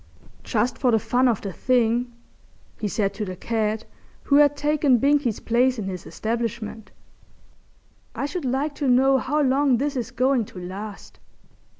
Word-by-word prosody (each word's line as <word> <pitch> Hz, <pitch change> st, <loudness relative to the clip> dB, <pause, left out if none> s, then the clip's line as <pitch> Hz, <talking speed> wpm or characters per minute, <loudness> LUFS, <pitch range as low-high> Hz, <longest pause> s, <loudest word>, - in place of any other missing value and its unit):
"Just 235 Hz, +1 st, -1 dB
for 255 Hz, -, +2 dB
the 225 Hz, -, +4 dB
fun 245 Hz, +4 st, +1 dB
of 230 Hz, -5 st, +1 dB
the 195 Hz, -2 st, -5 dB
thing," 245 Hz, +1 st, +1 dB, 0.7 s
he 215 Hz, -, -2 dB
said 200 Hz, -1 st, -1 dB
to 210 Hz, -, -4 dB
the 185 Hz, -2 st, -5 dB
cat, 220 Hz, +2 st, -2 dB, 0.4 s
who 285 Hz, -, +3 dB
had 290 Hz, -1 st, +5 dB
taken 295 Hz, -3 st, +2 dB
Binkie's 280 Hz, -3 st, +1 dB
place 250 Hz, +2 st, +2 dB
in 215 Hz, -, -4 dB
his 185 Hz, -2 st, -6 dB
establishment, 225 Hz, -1 st, -4 dB, 1.3 s
"I -, -, -2 dB
should 345 Hz, +4 st, -4 dB
like 270 Hz, +4 st, -1 dB
to 280 Hz, -, +1 dB
know 265 Hz, +2 st, +4 dB
how 300 Hz, +4 st, 0 dB
long 270 Hz, -1 st, +3 dB
this 285 Hz, +3 st, -2 dB
is 245 Hz, -3 st, -3 dB
going 255 Hz, -2 st, +1 dB
to 185 Hz, -, -11 dB
last. 195 Hz, +3 st, -8 dB
245 Hz, 165 wpm, -24 LUFS, 215-270 Hz, 1.3 s, had